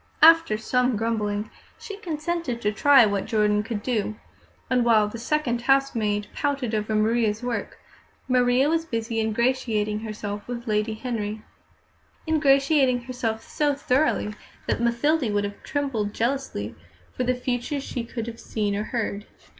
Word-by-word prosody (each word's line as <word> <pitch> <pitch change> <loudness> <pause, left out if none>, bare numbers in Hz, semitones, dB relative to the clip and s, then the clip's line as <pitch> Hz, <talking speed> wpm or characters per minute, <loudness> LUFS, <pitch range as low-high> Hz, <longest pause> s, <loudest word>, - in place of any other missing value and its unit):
After 330 -9 +7
some 250 +2 +1
grumbling, 215 -1 -1 0.3
she 405 - -8
consented 330 - -3
to 210 - +2
try 270 +2 +6
what 200 -2 -1
Jordan 210 -2 +2
could 210 -1 -5
do; 215 -4 -1 0.5
and 250 -1 +2
while 220 -3 +4
the 225 +2 -7
second 245 -2 0
housemaid 235 -6 +1
pouted 275 -5 -1
over 215 0 -1
Maria's 220 0 +1
work, 245 -2 -3 0.5
Maria 250 +1 +3
was 325 +1 +1
busy 230 -6 -3
ingratiating 220 -2 0
herself 210 -2 -6
with 240 0 -6
Lady 215 0 0
Henry 220 -3 -4 0.8
ingratiating 275 -4 +3
herself 235 -3 -3
so 295 -2 +1
thoroughly 265 -5 +1 0.3
that - - -1
Mathilde 235 +2 +1
would 205 0 +1
have 205 0 -5
trembled 255 -8 -2
jealously 235 - -2 0.4
for 255 - -1
the 250 0 +1
future 250 +2 -2
could 275 - -3
she 240 -4 -5 0.2
have 230 - -15
seen 205 -2 -2
or 210 +1 -2
heard. 215 -4 -3
235 Hz, 145 wpm, -25 LUFS, 215-270 Hz, 0.8 s, After